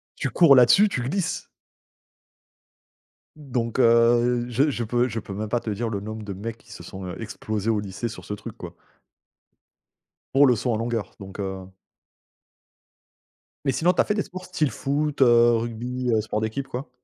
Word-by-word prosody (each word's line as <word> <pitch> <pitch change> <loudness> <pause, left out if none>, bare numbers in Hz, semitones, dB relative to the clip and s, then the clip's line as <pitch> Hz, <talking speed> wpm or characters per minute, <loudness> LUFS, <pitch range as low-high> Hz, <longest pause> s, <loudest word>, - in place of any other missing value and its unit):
tu - - -2
cours 165 -6 +6
là-dessus, 130 - +6
tu 125 - -2
glisses 165 +8 -2 1.9
donc 125 -6 -3
heu, 120 0 +4
je 135 +5 +2
je 120 - -3
peux 120 +2 +1
je 115 -2 -4
peux 100 - -8
même 105 +2 -4
pas 120 - +1
te 115 - -6
dire 110 +3 -2
le 100 - -3
nombre 110 +2 -7
de 100 -2 -5
mecs 110 +4 -6
qui 110 -1 -20
se - - -10
sont, 95 -1 -8
heu, 90 - -7
explosés 110 -1 -4
au 110 - +2
lycée 100 +2 -4
sur 115 - -9
ce 105 - -5
truc, 105 - -8
quoi. - - -8 1.6
Pour 140 +1 +6
le 125 - +4
saut 120 +2 -1
en - - 0
longueur, 115 -1 -3
donc 95 0 -10
heu 95 -1 -4 2.0
Mais 135 - +3
sinon, 170 +7 +2
tu - - +3
as - - 0
fait - - 0
des 205 -1 -1
sports 185 0 -9
style 155 -7 -1
foot, 145 +4 -2
heu, 120 -2 +6
rugby, 120 +2 -3
heu, 110 - +3
sports 105 0 -3
d'équipe, 110 +5 -3
quoi? 130 0 -6
120 Hz, 185 wpm, -24 LUFS, 110-130 Hz, 2.0 s, cours